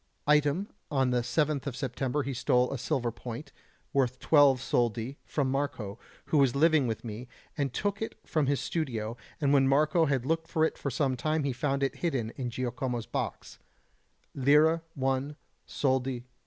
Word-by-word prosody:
Item: 150 +6 +3 0.2
on 135 -3 +1
the 125 -1 +2
7th 145 +3 0
of 135 - -3
September 135 +2 -2
he 135 - -3
stole 125 +1 +2
a - - -2
silver 120 0 -1
point, 120 +4 -8 0.4
worth 130 -2 +1
twelve 145 -4 +5
soldi, 120 +1 -1
from 135 -3 0
Marco, 120 -7 -3 0.3
who 155 - +2
was 135 -3 +3
living 155 -2 +4
with 115 +1 -4
me, 115 +3 -6 0.3
and 140 -3 -1
took 200 - -2
it 220 - -3
from 155 -4 0
his 140 0 +1
studio; 115 -9 -2 0.2
and 145 -2 +2
when 135 -1 +5
Marco 155 +4 +3
had 135 -3 0
looked 165 +2 0
for 160 0 +2
it - - -2
for 140 - -3
some 135 0 0
time 155 +4 0
he 140 -2 0
found 140 +2 -1
it 135 - -1
hidden 130 -10 -1
in 125 -1 -4
Giacomo's 125 -1 -3
box - - -5 0.7
lire 150 +5 +4
1, 135 +1 -1 0.3
soldi 130 -2 0
2. - - -19
135 Hz, 175 wpm, -29 LUFS, 125-150 Hz, 0.7 s, twelve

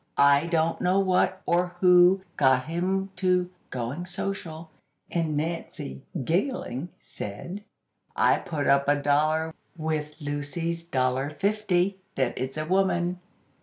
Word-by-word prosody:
I 140 +2 +5
don't 165 -1 +1
know 185 +2 +3
what, 185 0 +2
or 180 +1 +1
who, 180 +1 +6
got 130 -2 +3
him 190 +4 -1
to 180 -1 +1 0.2
'going 130 +8 -4
social.'" 170 -4 -4 0.4
And 160 -3 0
Nancy, 150 - -4 0.2
giggling, 175 - -1
said: 170 - -7 0.5
"I - - +4
put 150 -3 -3
up 140 0 +3
a 145 - +5
dollar, 155 +3 +1 0.2
with 155 -1 -2
Lucy's 155 +3 -3
dollar 130 -3 0
fifty 190 +2 0 0.2
that 130 -3 0
it's 130 +3 -4
a 155 - -2
woman." 180 0 +1
165 Hz, 125 wpm, -26 LUFS, 145-180 Hz, 0.5 s, who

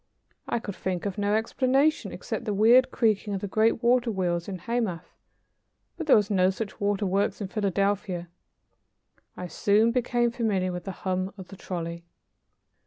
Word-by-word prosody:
I - - +1
could 210 -3 -5
think 185 -1 -3
of 200 +1 -3
no 205 +1 +1
explanation 260 +6 +1
except - - -5
the 210 -3 -1
weird 240 +5 +6
creaking 215 -4 +1
of 190 - -4
the 205 - -3
great 220 +3 +1
water 245 0 +3
wheels 175 -4 -1
in 195 -2 -4
Hamath, 205 -3 -3 0.8
but 330 - -6
there - - +7
were 210 - +5
no 185 -2 +4
such 195 +2 -5
waterworks 200 -1 0
in 200 -3 -4
Philadelphia. 195 -3 -1 1.1
I 180 - -5
soon 205 +6 +2
became 240 -1 +1
familiar 205 -6 0
with 180 -1 -6
the 195 - -3
hum 185 +1 -1
of 190 -2 -10
the 195 - -10
trolley. 170 -2 -5
205 Hz, 165 wpm, -26 LUFS, 185-230 Hz, 1.1 s, there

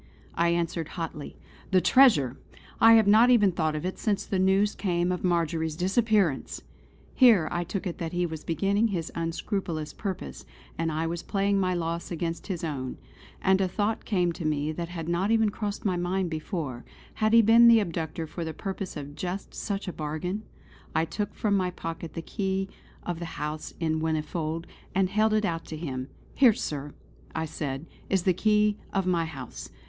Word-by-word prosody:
I 170 0 +2
answered 170 -1 -1
hotly: 160 -3 -5 0.3
"The 185 - +5
treasure! 175 - +5 0.4
I 225 0 +8
have 225 -1 +6
not 220 +4 +6
even 210 -6 +5
thought 160 -3 0
of 150 - -3
it 185 - -3
since 205 -3 0
the 190 - -1
news 195 +2 +3
came 175 -2 0
of 180 - -3
Marjory's 165 -3 0
disappearance!" 190 - +1 0.5
Here 225 - +6
I 175 0 -1
took 185 +3 -4
it 180 - -4
that 165 -1 -3
he 175 0 0
was 160 -2 -6
beginning 200 +6 +1
his 175 -6 -3
unscrupulous 165 -1 -3
purpose, 190 -3 -5 0.3
and 165 0 -1 0.2
was 170 +1 -3
playing 200 0 +1
my 185 -1 +1
loss 170 0 -3
against 165 -1 -3
his 180 -5 -4
own; 135 -5 -3 0.5
and 190 0 +4
a 190 - +2
thought 210 +4 -1
came 180 -5 +1
to 170 - -7
me 150 0 0
that 170 +2 -5
had 165 -2 -5
not 175 +4 0
even 220 -2 +3
crossed 205 0 -4
my 185 -3 +1
mind 175 0 -1
before 155 - -4 0.4
had 215 0 +3
he 230 0 +8
been 230 +2 +7
the 230 -1 +8
abductor 165 -4 -3
for 170 +2 -6
the 160 -1 -5
purpose 195 -2 -5
of 145 0 -7
just 185 +3 -5
such 200 -1 -3
a 180 - -3
bargain? 155 +7 -3 0.5
I 160 - +3
took 205 +6 -4
from 205 -2 +1
my 185 -2 +1
pocket 165 -2 -6
the 165 - -4
key 190 -1 -2 0.3
of 175 -2 -3
the 170 - -4
house 150 +1 -4
in 160 -2 0
Whinnyfold 160 +1 -2 0.3
and 190 -1 +2
held 215 +1 +3
it 215 -1 +2
out 165 -2 -2
to 155 - -6
him. 130 -5 -4 0.3
"Here 255 -5 +6
Sir" 145 -5 -5 0.4
I 160 0 -1
said 145 -2 -4 0.2
"is 190 -2 +2
the 185 - +3
key 210 +2 +3
of 195 -2 0
my 175 -2 +1
house. 135 -6 -8
175 Hz, 185 wpm, -27 LUFS, 160-200 Hz, 0.5 s, I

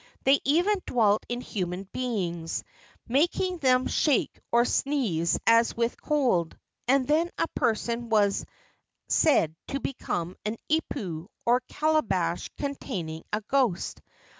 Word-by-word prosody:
They 275 +1 +5
even 355 +8 +2
dwelt 215 -4 +3
in 240 0 -2
human 185 -5 -3
beings, 180 -10 -2 0.4
making 340 +7 +1
them 255 -3 +3
shake 290 -6 +1
or 235 +1 +4
sneeze 225 - +1
as 230 0 +4
with 235 0 -1
cold, 245 - +1 0.3
and 265 0 +3
then 320 +4 +2
a - - +1
person 235 +1 -1
was 205 -3 +3 0.6
said 165 - +3
to 275 - -2
become 180 -10 -3
an 215 +2 -3
ipu, 190 - -2 0.2
or 240 +1 +4
calabash 200 - 0
containing 190 - -4
a 210 - -1
ghost. 240 -5 0
235 Hz, 120 wpm, -27 LUFS, 190-275 Hz, 0.6 s, They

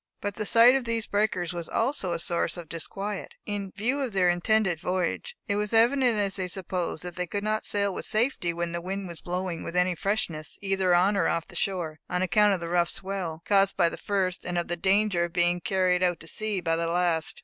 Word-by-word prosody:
But 205 0 -3
the 210 +1 -2
sight 235 +2 +7
of 265 -2 0
these 230 -1 -1
breakers 200 -5 0
was 170 -2 -5
also 225 -6 0
a 170 - 0
source 170 +2 -1
of 170 -2 -8
disquiet, 195 +5 -5
in 200 -2 -3
view 250 +8 0
of 255 -6 -3
their 185 -2 +3
intended 175 0 +1
voyage. 185 - -2
It 200 -3 0
was 210 +1 -1
evident, 240 +1 +4
as 200 -2 0
they 185 -1 -2
supposed, 180 -2 -3
that 180 0 -7
they 180 0 -2
could 200 +3 -3
not 215 +1 -1
sail 200 -1 0
with - - -6
safety, 215 -6 +1
when 170 0 -3
the 170 0 -3
wind 190 +2 -4
was 170 -2 -8
blowing 180 -1 -3
with 170 - -6
any 180 0 +3
freshness, 170 -4 -2
either 195 -2 +2
on 190 +4 +3
or 195 - +2
off 165 -1 0
the - - -14
shore, 170 -4 -2
on 180 +1 0
account 205 +2 +4
of - - -5
the 170 - -5
rough 175 0 +2
swell, 185 -4 -3
caused 195 -1 +3
by 170 - +4
the - - -6
first, 190 -3 -1
and 175 0 -3
of 175 - -2
the 175 - 0
danger 190 0 +2
of 170 - -9
being 175 0 +2
carried 185 -1 +1
out 175 -2 +1
to 165 - -10
sea 215 0 -2
by 165 -1 +1
the 165 0 -1
last. 170 -2 0
185 Hz, 235 wpm, -27 LUFS, 175-205 Hz, -, sight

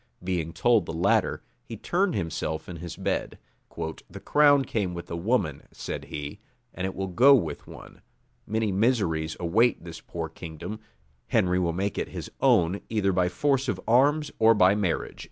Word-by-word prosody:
Being 85 -3 -2
told 115 0 +2
the - - -4
latter, 90 +4 +1 0.2
he - - -8
turned 185 0 0
himself 80 -1 -3
in 90 - -7
his 85 0 -7
bed: - - -2 0.4
"The 80 0 -6
crown 145 -2 +4
came 95 -5 -2
with 85 - -8
a - - -2
woman," 85 - 0
said - - -6
he, 75 -1 -6 0.3
"and 95 +2 -3
it 95 - -6
will 95 - -2
go 125 +10 +6
with 80 - -2
one: - - -13 0.5
many 110 0 0
miseries 95 -7 0
await 110 +8 +2
this 85 -1 -9
poor 85 -1 -5
kingdom: 85 +5 -8 0.5
Henry 90 0 +2
will 85 -2 +1
make 100 +3 -2
it - - -2
his - - -7
own 100 -8 +3
either 105 -4 +1
by 90 -1 +2
force 135 +4 0
of - - -1
arms 145 +6 +3
or 115 0 +6
by 95 -1 +5
marriage." 100 -4 -2
95 Hz, 170 wpm, -26 LUFS, 85-115 Hz, 0.5 s, go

